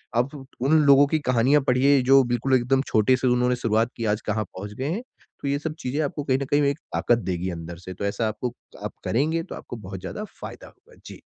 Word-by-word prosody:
आप 125 +5 +1
उट 135 -2 -10 0.2
उन 155 +1 +5
लोगों 140 0 +7
की 155 +1 +1
कहानियाँ 130 +2 +3
पढ़िए, 135 +2 +4
जो 135 +1 +6
बिल्कुल 120 +2 +1
एकदम 130 +2 +2
छोटे 110 +4 +3
से 130 - 0
उन्होंने 125 0 +2
शुरुआत 115 0 +1
की 115 - -3
आज 105 - -4
कहाँ 110 0 0
पहुँच 100 +2 -7
गए 130 +6 -3
हैं। 210 - -2 0.4
तो 140 - -3
ये 140 +1 0
सब 155 0 -4
चीज़ें 135 +4 -2
आपको 145 0 -3
कहीं 130 -2 +1
न - - -1
कहीं 145 +1 +4
एक - - -7
ताकत 120 - +2
देगी 90 +1 -2
अंदर 85 0 -7
से 95 +2 -9
तो 100 - -5
ऐसा 110 +3 0
आपको 110 +3 -3 0.3
आप - - -4
करेंगे 160 +7 0
तो - - -8
आपको - - -8
बहुत 95 -3 -8
ज़्यादा 210 - -5 0.2
फ़ायदा - - -9
होगा। 485 - -21
जी। - - -10
125 Hz, 240 wpm, -24 LUFS, 110-140 Hz, 0.4 s, लोगों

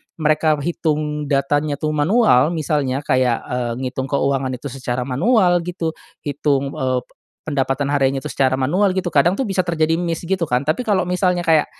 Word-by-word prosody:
mereka 155 0 +2
hitung 150 -2 -2
datanya 145 +1 +1
tuh 155 +2 -2
manual, 160 - +3
misalnya 145 -3 -1
kayak, 130 -3 +1
eee, 125 -1 -1
ngitung 130 +1 -3
keuangan 135 -1 0
itu 135 +3 -7
secara 125 -1 -3
manual 175 - +2
gitu, 175 -2 -3 0.3
hitung, 140 -1 0
eee, 130 -1 0 0.4
pendapatan 140 -1 -1
hariannya 135 -1 +1
itu 150 - -6
secara 130 +1 +1
manual 185 +9 +2
gitu 185 -1 -1
kadang 165 +3 +3
tuh 200 - -2
bisa 195 -5 -1
terjadi 165 -1 +1
miss 170 -2 -2
gitu 180 0 -1
kan, 125 -3 0
tapi 155 - -1
kalau 200 -4 +2
misalnya 180 0 0
kayak, 160 -3 +3
150 Hz, 170 wpm, -20 LUFS, 135-175 Hz, 0.4 s, manual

